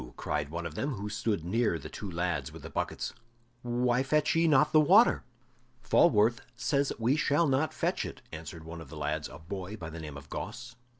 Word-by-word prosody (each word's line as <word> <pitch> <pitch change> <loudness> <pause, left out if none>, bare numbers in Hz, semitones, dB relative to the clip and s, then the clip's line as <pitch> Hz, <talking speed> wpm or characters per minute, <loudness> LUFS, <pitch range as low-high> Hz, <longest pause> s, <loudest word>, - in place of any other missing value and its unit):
cried 75 -1 -2
one 85 +2 -4
of 85 - -5
them, 140 - -2
who 105 0 -5
stood 105 -4 -1
near 110 -1 +1
the 75 - -8
two 100 - -7
lads 85 0 -2
with - - -11
the - - -8
buckets. - - -3 0.5
"Why 120 +1 +1
fetch 150 +2 +2
ye 165 0 +4
not 150 -1 +5
the 155 - +8
water?" 195 +10 +6 0.6
"Falworth 115 -6 +4
says 140 +2 +1
we 120 +4 +2
shall 150 +1 +2
not 140 +2 +2
fetch - - -1
it," - - -8
answered 80 0 -8
one 80 +1 -8
of 75 - -11
the 80 - -9
lads, 75 +1 -2
a - - -10
boy 90 +5 -6
by 80 -5 -7
the 80 - -7
name 75 -3 -7
of 70 0 -11
Gosse. 120 - -6
105 Hz, 205 wpm, -30 LUFS, 80-135 Hz, 0.6 s, the